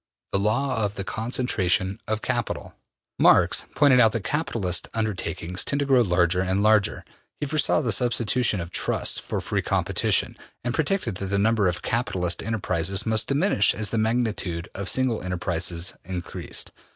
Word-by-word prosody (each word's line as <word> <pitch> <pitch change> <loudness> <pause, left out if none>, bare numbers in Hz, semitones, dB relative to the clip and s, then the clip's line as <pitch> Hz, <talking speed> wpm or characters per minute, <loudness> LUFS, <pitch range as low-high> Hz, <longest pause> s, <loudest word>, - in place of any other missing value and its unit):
The 100 - +3
Law 115 +3 0
of 100 0 -2
the 100 - -4
Concentration 100 -3 -1
of 110 0 -2
Capital. 120 -3 -3 0.5
Marx - - +4
pointed 140 -3 +5
out 110 -3 +5
that 115 - -2
capitalist 115 - -1
undertakings 90 -5 -2
tend 140 - -1
to 140 - 0
grow 135 -2 +4
larger 90 -3 +2
and 95 +2 0
larger. 110 -2 +2 0.3
He - - -2
foresaw 155 +1 +2
the 120 -6 -1
substitution 120 -2 +2
of 85 0 -6
trusts - - 0
for - - -4
free - - -1
competition, - - 0 0.3
and 120 0 -2
predicted 160 - -1
that 100 - -4
the 100 +1 0
number 105 -1 +2
of 90 -1 -2
capitalist 90 -8 -1
enterprises 100 -2 -1
must 110 -1 +1
diminish 140 - +3
as 105 -1 -2
the 115 - 0
magnitude 110 -7 -1
of 100 -1 -2
single 130 -3 0
enterprises 90 -1 -2
increased. 90 -1 -5
110 Hz, 160 wpm, -24 LUFS, 95-120 Hz, 0.5 s, pointed